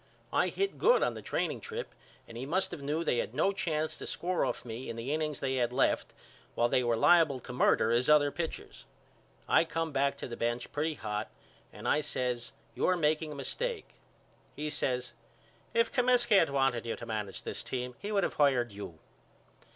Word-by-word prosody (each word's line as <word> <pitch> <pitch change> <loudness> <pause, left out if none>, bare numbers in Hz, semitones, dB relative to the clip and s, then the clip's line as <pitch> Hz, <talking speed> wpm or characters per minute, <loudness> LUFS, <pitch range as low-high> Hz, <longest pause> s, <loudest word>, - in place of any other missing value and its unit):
I - - +3
hit 395 0 -2
good - - +5
on - - +1
the - - -8
training - - -2
trip 470 +1 -6 0.3
and 115 - -11
he 120 - -5
must 180 +8 0
of - - -6
knew 150 +4 -1
they 125 - +1
had 115 - -3
no 175 +7 +3
chance 160 -6 -2
to - - -6
score 180 +1 -1
off - - -2
me 120 +2 -6
in - - -4
the 120 +5 -3
innings 155 -1 -1
they 130 -1 -1
had 120 -1 +1
left 125 - +1 0.4
while 120 - +3
they 125 +1 +2
were 120 -1 +2
liable 160 -2 +5
to 125 - -8
murder 125 -2 +3
his 120 +3 +2
other 145 -1 +5
pitchers. 165 +1 -5 0.6
I - - +5
come 165 -1 -2
back 140 0 +1
to - - -5
the 120 - -6
bench 120 +1 -2
pretty 155 +2 -1
hot 105 -4 -4 0.4
and - - -7
I 150 - +3
says 125 -4 -2 0.2
You're 185 - +2
making 155 -1 +1
a - - -6
mistake. 465 - -3 0.7
He 150 0 -3
says 125 -4 -1 0.6
If 230 0 +2
Comiskey 245 -5 +4
had 165 - +3
wanted 135 -4 +1
you 115 - -1
to - - -8
manage 105 -3 -4
this - - -4
team 125 -1 -4
he 205 - -5
would 200 -2 +2
of - - 0
hired 130 -5 +3
you. 100 -5 -8
140 Hz, 200 wpm, -31 LUFS, 120-165 Hz, 0.7 s, good